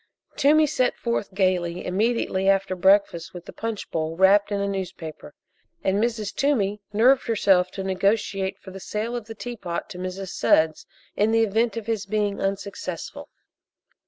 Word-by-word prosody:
Toomey 305 Hz, +2 st, +5 dB
set 255 Hz, -3 st, +1 dB
forth 235 Hz, -4 st, -2 dB
gaily 185 Hz, -2 st, 0 dB
immediately 195 Hz, -1 st, 0 dB
after 195 Hz, -1 st, +2 dB
breakfast 190 Hz, -2 st, +2 dB
with 175 Hz, -1 st, -9 dB
the -, -, -10 dB
punch 225 Hz, -2 st, -5 dB
bowl 160 Hz, 0 st, -2 dB
wrapped 200 Hz, +2 st, +5 dB
in 200 Hz, -, 0 dB
a 200 Hz, -, -1 dB
newspaper, 175 Hz, -6 st, -6 dB, 0.5 s
and 195 Hz, +3 st, +1 dB
Mrs. 225 Hz, -4 st, -2 dB
Toomey 210 Hz, -8 st, 0 dB
nerved 250 Hz, +6 st, +4 dB
herself 195 Hz, -5 st, +3 dB
to 195 Hz, -, -4 dB
negotiate 195 Hz, 0 st, 0 dB
for 190 Hz, -, -12 dB
the 195 Hz, -, -9 dB
sale 215 Hz, +5 st, -3 dB
of 240 Hz, -3 st, -5 dB
the 225 Hz, -, -8 dB
teapot 210 Hz, -6 st, -5 dB
to 180 Hz, -, -8 dB
Mrs. 185 Hz, +1 st, -5 dB
Sudds, 160 Hz, -2 st, +2 dB, 0.3 s
in 210 Hz, +2 st, +2 dB
the 225 Hz, 0 st, +4 dB
event 225 Hz, +2 st, +1 dB
of 225 Hz, -, -4 dB
his 215 Hz, -3 st, -2 dB
being 205 Hz, -1 st, -1 dB
unsuccessful. 195 Hz, -3 st, -4 dB
200 Hz, 160 wpm, -24 LUFS, 185-225 Hz, 0.5 s, Toomey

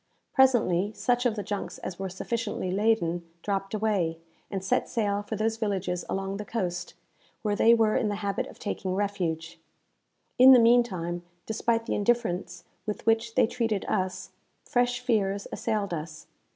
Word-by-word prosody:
Presently, 215 Hz, -8 st, +3 dB
such 245 Hz, 0 st, +1 dB
of 225 Hz, -, -1 dB
the 205 Hz, -, -3 dB
junks 205 Hz, 0 st, -4 dB
as 180 Hz, -, -7 dB
were 195 Hz, -1 st, -3 dB
sufficiently 210 Hz, 0 st, -3 dB
laden, 195 Hz, -4 st, +1 dB, 0.2 s
dropped 195 Hz, 0 st, -2 dB
away, 200 Hz, -7 st, 0 dB, 0.3 s
and 195 Hz, -2 st, -4 dB
set -, -, +1 dB
sail 205 Hz, -3 st, 0 dB
for 210 Hz, +2 st, -5 dB
those 220 Hz, +1 st, 0 dB
villages 190 Hz, -5 st, -1 dB
along 195 Hz, 0 st, -2 dB
the 210 Hz, -, -4 dB
coast, 180 Hz, -5 st, -3 dB, 0.5 s
where 210 Hz, -1 st, +1 dB
they 230 Hz, +3 st, +6 dB
were 220 Hz, -2 st, +3 dB
in 220 Hz, -, +1 dB
the 205 Hz, -, -1 dB
habit 200 Hz, -1 st, -2 dB
of -, -, -13 dB
taking 190 Hz, -2 st, -3 dB
refuge. 170 Hz, -5 st, -2 dB, 0.8 s
In 260 Hz, +1 st, +10 dB
the 250 Hz, -, +8 dB
meantime, 210 Hz, -8 st, +3 dB, 0.2 s
despite 230 Hz, +1 st, 0 dB
the -, -, -2 dB
indifference 200 Hz, -6 st, 0 dB, 0.2 s
with 210 Hz, -, -4 dB
which 225 Hz, 0 st, +2 dB
they -, -, +5 dB
treated 225 Hz, -3 st, -1 dB
us, 185 Hz, -3 st, -2 dB, 0.3 s
fresh 245 Hz, 0 st, +1 dB
fears 200 Hz, -4 st, 0 dB
assailed 205 Hz, -4 st, -1 dB
us. 155 Hz, -1 st, -6 dB
205 Hz, 160 wpm, -27 LUFS, 185-225 Hz, 0.8 s, In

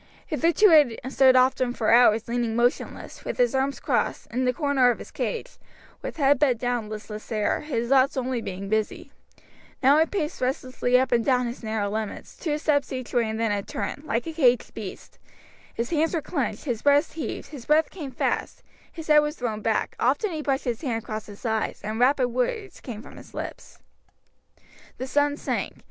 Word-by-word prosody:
Hitherto 335 Hz, +6 st, +3 dB
he 290 Hz, -8 st, +6 dB
had 260 Hz, +2 st, -6 dB
stood 260 Hz, -1 st, +6 dB
often 255 Hz, -1 st, +3 dB
for 220 Hz, -3 st, 0 dB
hours 230 Hz, -2 st, +5 dB
leaning 235 Hz, -1 st, -1 dB
motionless, 240 Hz, +2 st, -1 dB
with -, -, -4 dB
his -, -, +3 dB
arms 270 Hz, +1 st, 0 dB
crossed, -, -, -1 dB
in 255 Hz, +2 st, 0 dB
the 250 Hz, -, +3 dB
corner 270 Hz, -2 st, +2 dB
of 240 Hz, -, +1 dB
his -, -, -11 dB
cage, -, -, -4 dB, 0.4 s
with -, -, -6 dB
head 280 Hz, -2 st, +4 dB
bent 265 Hz, -5 st, +3 dB
down 245 Hz, -2 st, -1 dB
and -, -, -11 dB
listless 215 Hz, 0 st, -8 dB
air, 215 Hz, -2 st, +1 dB
his 240 Hz, -6 st, -3 dB
thoughts 270 Hz, 0 st, +4 dB
only 255 Hz, -2 st, -1 dB
being 195 Hz, -1 st, -6 dB
busy; 215 Hz, +1 st, -2 dB, 0.7 s
now 280 Hz, +4 st, +6 dB
he 320 Hz, -, +4 dB
paced 315 Hz, -6 st, -3 dB
restlessly 255 Hz, -1 st, +1 dB
up 260 Hz, 0 st, 0 dB
and 235 Hz, -1 st, +3 dB
down 250 Hz, -1 st, +2 dB
his 240 Hz, +1 st, -5 dB
narrow 220 Hz, -2 st, -2 dB
limits, 215 Hz, +1 st, -5 dB
two 300 Hz, -4 st, -2 dB
steps 295 Hz, -2 st, +1 dB
each 255 Hz, -2 st, -5 dB
way 235 Hz, -3 st, +2 dB
and 220 Hz, 0 st, -3 dB
then 225 Hz, -2 st, +1 dB
a 205 Hz, -1 st, 0 dB
turn, 285 Hz, -, -5 dB
like 240 Hz, -6 st, -1 dB
a 325 Hz, -, -5 dB
caged 250 Hz, -6 st, +2 dB
beast; -, -, -9 dB, 0.6 s
his 235 Hz, +1 st, -3 dB
hands 325 Hz, +1 st, +1 dB
were -, -, +1 dB
clenched, 285 Hz, -3 st, -3 dB
his 240 Hz, -6 st, -2 dB
breast 285 Hz, 0 st, +3 dB
heaved, 295 Hz, -3 st, -5 dB
his 275 Hz, -6 st, -10 dB
breath 310 Hz, +1 st, +3 dB
came 310 Hz, -7 st, -6 dB
fast, 255 Hz, -, -2 dB, 0.3 s
his 325 Hz, -2 st, -8 dB
head 300 Hz, -1 st, +6 dB
was 295 Hz, +1 st, -1 dB
thrown 225 Hz, -5 st, -3 dB
back, 220 Hz, 0 st, 0 dB
often 285 Hz, -, +1 dB
he 315 Hz, -2 st, -3 dB
brushed 275 Hz, -2 st, -1 dB
his 240 Hz, -3 st, -2 dB
hand 230 Hz, -7 st, -2 dB
across 215 Hz, 0 st, -5 dB
his 205 Hz, +3 st, -12 dB
eyes, 220 Hz, -1 st, -1 dB
and 215 Hz, +2 st, -3 dB
rapid 255 Hz, 0 st, +3 dB
words 360 Hz, -, -2 dB
came 225 Hz, -3 st, -7 dB
from -, -, -13 dB
his -, -, -14 dB
lips. -, -, -7 dB, 1.2 s
The 260 Hz, -, -4 dB
sun 290 Hz, +2 st, +1 dB
sank. -, -, -2 dB
255 Hz, 200 wpm, -25 LUFS, 230-290 Hz, 1.2 s, he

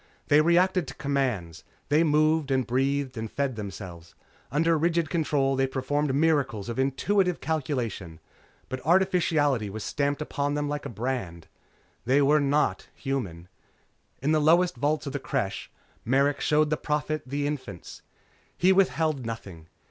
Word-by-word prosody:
They 145 Hz, +1 st, +6 dB
reacted 175 Hz, +1 st, +3 dB
to 130 Hz, -, -8 dB
commands. 130 Hz, -, -2 dB, 0.3 s
They 150 Hz, +3 st, +4 dB
moved 155 Hz, -1 st, +2 dB
and 130 Hz, -2 st, +1 dB
breathed 135 Hz, +1 st, -1 dB
and 110 Hz, 0 st, -4 dB
fed 140 Hz, 0 st, -2 dB
themselves. 95 Hz, -5 st, -8 dB, 0.4 s
Under 165 Hz, +4 st, +2 dB
rigid 165 Hz, 0 st, +1 dB
control 145 Hz, -5 st, +1 dB
they 135 Hz, 0 st, +1 dB
performed 135 Hz, +2 st, -1 dB
miracles 140 Hz, -9 st, +1 dB
of 115 Hz, -, -4 dB
intuitive 180 Hz, +7 st, +1 dB
calculation. 125 Hz, -, -3 dB, 0.5 s
But 130 Hz, -, -6 dB
artificiality 160 Hz, -, +2 dB
was 105 Hz, +2 st, -6 dB
stamped 145 Hz, -1 st, -1 dB
upon 145 Hz, -1 st, -2 dB
them 145 Hz, 0 st, -1 dB
like 145 Hz, 0 st, -3 dB
a -, -, -8 dB
brand. 110 Hz, -7 st, -4 dB, 0.6 s
They 130 Hz, +4 st, +3 dB
were 145 Hz, +2 st, +4 dB
not 145 Hz, +1 st, +1 dB
human. 100 Hz, -, -4 dB, 0.8 s
In 145 Hz, -, +2 dB
the 155 Hz, -1 st, +3 dB
lowest 170 Hz, +3 st, +4 dB
vaults 145 Hz, +5 st, 0 dB
of 140 Hz, -, -5 dB
the 145 Hz, -, -2 dB
Creche, 125 Hz, -8 st, -3 dB, 0.3 s
Merrick 140 Hz, +4 st, +2 dB
showed 150 Hz, 0 st, +2 dB
the 155 Hz, -, +1 dB
Prophet 150 Hz, +1 st, -2 dB
the 145 Hz, +2 st, -2 dB
infants. 130 Hz, -, -6 dB, 0.6 s
He 185 Hz, +2 st, +4 dB
withheld 160 Hz, -7 st, +1 dB
nothing. 95 Hz, -8 st, -7 dB
140 Hz, 150 wpm, -26 LUFS, 125-155 Hz, 0.8 s, They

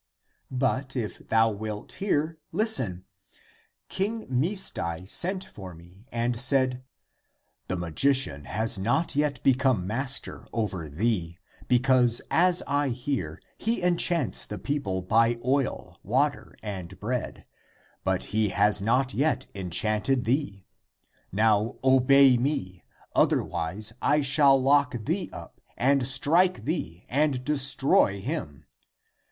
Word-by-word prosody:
But 130 Hz, +1 st, -2 dB
if 115 Hz, -5 st, -5 dB
thou 115 Hz, 0 st, +3 dB
wilt 105 Hz, 0 st, -6 dB
hear, 160 Hz, -4 st, -2 dB
listen: 125 Hz, -, +1 dB, 0.8 s
King 215 Hz, +4 st, -3 dB
Misdai 125 Hz, -, 0 dB
sent 185 Hz, -, +1 dB
for 95 Hz, -, -11 dB
me 90 Hz, +7 st, -18 dB
and 120 Hz, 0 st, -2 dB
said, 130 Hz, -1 st, +2 dB, 0.8 s
the 95 Hz, -, -2 dB
magician 85 Hz, -, +2 dB
has 110 Hz, 0 st, -2 dB
not 120 Hz, -, 0 dB
yet 145 Hz, -1 st, -1 dB
become 130 Hz, -7 st, +2 dB
master 130 Hz, +7 st, -3 dB
over 95 Hz, -8 st, -3 dB
thee, 85 Hz, 0 st, -2 dB, 0.3 s
be 125 Hz, -, +4 dB
cause 125 Hz, -2 st, +3 dB
as 180 Hz, +1 st, +4 dB
I 145 Hz, 0 st, 0 dB
hear, 125 Hz, -, -4 dB, 0.2 s
he 225 Hz, -3 st, -1 dB
enchants 170 Hz, -, +2 dB
the 105 Hz, -, -6 dB
people 100 Hz, -11 st, -3 dB
by 115 Hz, +4 st, +2 dB
oil, 135 Hz, +1 st, -2 dB
water 135 Hz, +7 st, -1 dB
and 95 Hz, -3 st, -7 dB
bread, 120 Hz, +4 st, -4 dB, 0.6 s
but 95 Hz, -1 st, -1 dB
he 110 Hz, -1 st, +1 dB
has 105 Hz, +1 st, +2 dB
not 125 Hz, +5 st, +1 dB
yet 150 Hz, +4 st, 0 dB
enchanted 105 Hz, +7 st, 0 dB
thee. 115 Hz, -6 st, -2 dB, 0.7 s
Now 110 Hz, +3 st, +1 dB
obey 130 Hz, 0 st, +5 dB
me, 95 Hz, -, -3 dB, 0.3 s
otherwise 100 Hz, +7 st, 0 dB
I 150 Hz, +1 st, +2 dB
shall 140 Hz, -1 st, +5 dB
lock 130 Hz, -4 st, +1 dB
thee -, -, -2 dB
up -, -, -11 dB, 0.2 s
and 135 Hz, 0 st, +2 dB
strike 145 Hz, -, +2 dB
350 150 Hz, -, 0 dB
THE 165 Hz, -, -1 dB
APOCRYPHAL 85 Hz, +3 st, -14 dB
ACTS 150 Hz, 0 st, +2 dB
thee, -, -, -2 dB
and 125 Hz, -, -10 dB
destroy 135 Hz, -7 st, +2 dB
him. 120 Hz, -, -6 dB
125 Hz, 125 wpm, -26 LUFS, 105-140 Hz, 0.8 s, obey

